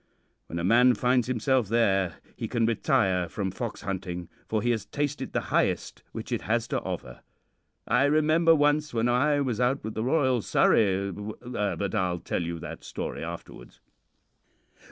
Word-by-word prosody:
When 85 - -5
a 85 - -2
man 120 +6 +5
finds 125 +1 +2
himself 130 -1 +1
there, 95 -6 +2 0.2
he - - -4
can 115 -1 +1
retire 95 -5 +1
from 95 -1 -3
fox 115 +3 -5
hunting, 90 -3 -4 0.2
for 110 0 -1
he 120 - +2
has 110 -3 -1
tasted 145 0 -3
the - - 0
highest - - 0
which - - -7
it - - -1
has - - 0
to - - -1
offer. 60 -1 -6 0.7
I 125 +4 +3
remember 155 +3 +4
once 150 -2 +2
when 115 +1 +2
I 145 +4 +2
was 125 -4 -1
out 125 +3 +1
with 110 - -4
the 110 - -2
Royal 130 -3 +2
Surrey 100 -2 +2
but 105 -2 -4
I'll 90 -4 0
tell - - -2
you 85 0 -3
that 85 - -8
story - - -5
afterwards. - - -9
115 Hz, 165 wpm, -27 LUFS, 95-130 Hz, 0.7 s, man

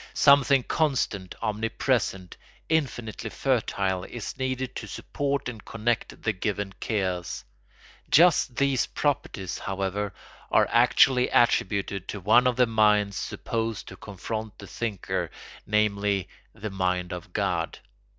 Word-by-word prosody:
Something 140 -2 +5
constant, 125 - -1
omnipresent, 110 -3 -1 0.3
infinitely 120 -8 -1
fertile 100 -8 0
is 120 -3 -6
needed 130 -1 -3
to - - -6
support 140 -1 -2
and 115 -4 -7
connect 115 +1 -2
the 110 - +1
given 100 0 -3
chaos. 95 -5 -2 0.7
Just 160 -6 +5
these 140 -1 +2
properties, 100 - -2
however, 100 +1 -2 0.4
are - - +4
actually 125 -2 +5
attributed 100 -4 +2
to 105 - -5
one 110 +7 +5
of 125 - +2
the 125 - +5
minds 105 -3 +3
supposed 115 +2 -3
to - - -9
confront 110 +1 -6
the 100 - -10
thinker, 105 -1 -3 0.4
namely, 100 -2 +1 0.2
the 110 0 -6
mind 90 -1 -1
of 90 -2 -8
God. - - -1
110 Hz, 120 wpm, -26 LUFS, 100-125 Hz, 0.7 s, Something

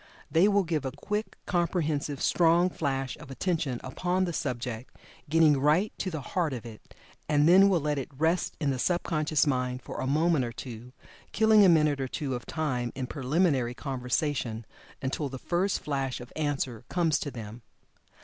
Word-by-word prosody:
They 170 +5 +5
will 200 -1 +3
give 160 -4 -1
a 130 - -3
quick, 210 +1 -4
comprehensive, 160 -5 -1
strong 175 +1 +4
flash 135 -5 -2
of 150 -2 -12
attention 150 -3 -1
upon 180 +8 -1
the 175 - -3
subject, 120 -3 -4 0.3
getting 155 -2 +5
right 155 +9 +2
to 190 - -1
the 160 -4 -4
heart 160 +1 -1
of 120 -2 -6
it, 110 -2 -12 0.3
and 150 0 +4
then 190 +3 +7
will 180 -5 +2
let 150 -1 0
it 135 - -6
rest 165 +4 0
in 145 -3 +1
the 130 - -3
sub 175 +7 +1
conscious 155 -2 +1
mind 125 -2 -1
for - - -6
a 130 - -2
moment 155 0 +2
or 120 - -3
two, 120 0 -8 0.4
killing 220 -1 +6
a 190 - +7
minute 150 -4 +3
or 135 - -1
two 135 +1 -3
of 120 -1 -5
time 125 -7 -2
n 130 0 -3
"preliminary 135 -2 0
conversation," 125 -3 -2 0.4
until 135 +2 -2
the 130 - -6
first 180 +8 0
flash 135 -3 -2
of 120 0 -11
answer 135 -6 -2
comes 165 -4 +1
to 145 - -4
them. 115 -2 -8
145 Hz, 180 wpm, -28 LUFS, 130-170 Hz, 0.4 s, then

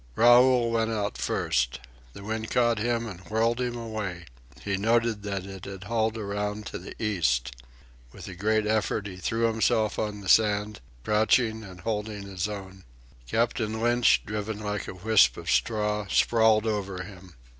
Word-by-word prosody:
Raoul 120 0 +5
went 115 -1 +1
out 105 -2 -2
first. - - 0 0.3
The 100 - -10
wind 110 +1 -4
caught 120 -2 +2
him 115 +1 0
and 95 -5 -8
whirled 115 +3 +1
him 120 -1 -2
away. 105 -7 -5 0.4
He 100 -1 -1
noted 115 +1 +1
that 100 -2 -4
it 95 -1 -9
had 95 -1 -8
hauled 110 +1 -1
around 105 0 -3
to - - -6
the - - -10
east. 75 - 0 0.6
With - - -11
a 95 - -7
great 110 +4 0
effort 105 -1 0
he 95 -3 -7
threw 110 +5 -2
himself 110 -1 +1
on 105 -1 -3
the 100 - -9
sand, 105 0 +3 0.2
crouching 110 - +2
and 95 -2 -11
holding 105 -2 -3
his 100 0 -3
own. 95 -2 -8 0.4
Captain 110 - 0
Lynch, 120 +1 +3
driven 105 0 -4
like 105 -1 -4
a - - -7
wisp 110 +3 +4
of - - -3
straw, 105 -2 0
sprawled 110 0 +3
over 100 -4 -2
him. 95 -3 -13
105 Hz, 165 wpm, -27 LUFS, 100-115 Hz, 0.6 s, Raoul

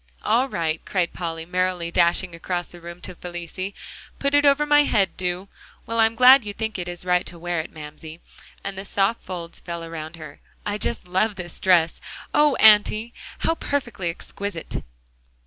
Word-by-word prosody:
"All 245 +5 +2
right," 160 -5 -1
cried 180 -3 -1
Polly, 165 -2 -4
merrily 180 -1 -1
dashing 175 +1 +2
across 175 +1 -3
the 175 - -11
room 170 +1 -9
to 185 - -6
Felicie, 180 +2 -6 0.4
"put 280 0 0
it 290 0 +5
over 285 +1 +4
my 295 0 +6
head, 210 -9 +2
do. 180 +1 -3 0.4
Well, 230 -1 -2
I'm 225 0 +4
glad 255 +2 +8
you 205 -1 -5
think 220 -1 -3
it 175 - -4
is 175 0 -6
right 180 0 +3
to 175 - -8
wear 175 0 -2
it, 160 - -5
Mamsie," 155 +1 -10 0.5
as 195 - -3
the 190 0 -7
soft 200 +3 0
folds 175 -2 -6
fell 170 -1 -6
around 165 -1 -7
her. 155 -2 -11 0.3
"I 205 0 -2
just 235 - -1
love 195 +4 +1
this 175 -3 -5
dress. 175 -3 +3 0.3
Oh, 295 -2 +4
Auntie! 215 +2 +5 0.3
how - - +3
perfectly 240 - -2
exquisite!" 185 +1 -5
185 Hz, 180 wpm, -23 LUFS, 170-220 Hz, 0.5 s, glad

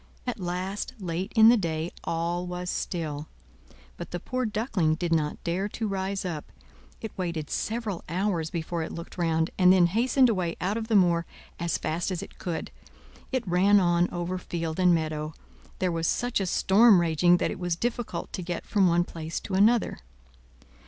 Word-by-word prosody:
At 245 -3 -3
last, 185 +4 -3
late 185 +2 -3
in 220 0 +8
the 240 - +6
day, 165 -3 -2
all 170 +2 -2
was 180 0 -4
still; 155 -4 -3 0.7
but - - -7
the 175 - -4
poor 255 +5 -2
Duckling 210 -7 0
did 170 0 -1
not 150 -2 -1
dare 185 +4 -1
to 220 +1 -3
rise 195 0 -2
up; 160 -5 -5 0.5
it 220 - -7
waited 170 -4 -3
several 220 -5 -2
hours 175 -2 0
before 170 0 -3
it 160 - -4
looked 170 +2 -8
round, 165 -1 +1
and 180 0 +7
then 185 -2 +6
hastened 250 +8 +3
away 185 -7 0
out 195 +3 -1
of 225 -1 -3
the 225 - +1
moor 170 -3 +4 0.3
as 170 -2 0
fast 170 +4 -2
it 180 -3 -6
could. 170 -3 -4 0.6
It 255 -5 -1
ran 190 +4 +5
on 175 -1 +2
over 175 +1 -3
field 165 -2 -4
and 180 -1 +5
meadow; 155 -2 -1 0.4
there 185 -1 0
was 165 0 -1
such 245 -2 0
a 195 - -1
storm 200 +3 +5
raging 175 +1 +4
that - - 0
it - - -6
was 175 -2 -1
difficult 240 +4 -3
to 185 - -3
get 175 -1 -4
from 200 -3 +3
one 175 0 +3
place 165 -2 -5
to 195 - -7
another. 215 +5 +3
180 Hz, 180 wpm, -27 LUFS, 170-200 Hz, 0.7 s, in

